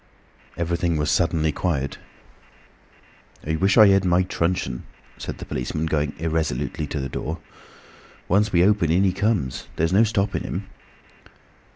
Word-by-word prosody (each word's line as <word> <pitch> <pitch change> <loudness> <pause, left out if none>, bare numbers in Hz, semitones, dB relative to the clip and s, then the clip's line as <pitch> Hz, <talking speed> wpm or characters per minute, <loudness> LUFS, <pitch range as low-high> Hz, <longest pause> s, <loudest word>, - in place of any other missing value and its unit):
Everything 85 -1 0
was 75 0 0
suddenly 80 -1 +2
quiet. 70 -5 -2 1.5
"I 80 +1 0
wish 95 +6 +2
I 105 -3 +9
had 95 0 +4
my 90 0 +3
truncheon," 85 -8 -1 0.4
said - - -5
the - - -8
policeman, 70 +5 -3
going 75 -2 -1
irresolutely 80 -2 -2
to 75 - -4
the 65 - -2
door. 80 +4 -4 0.9
"Once 100 +3 +2
we 90 0 +4
open, 105 -5 +3
in 90 +4 +3
he 95 -2 +2
comes. 100 - -1
There's 80 +3 0
no 105 +4 +6
stopping 105 -3 0
him." 95 +3 -4
85 Hz, 145 wpm, -23 LUFS, 75-95 Hz, 1.5 s, I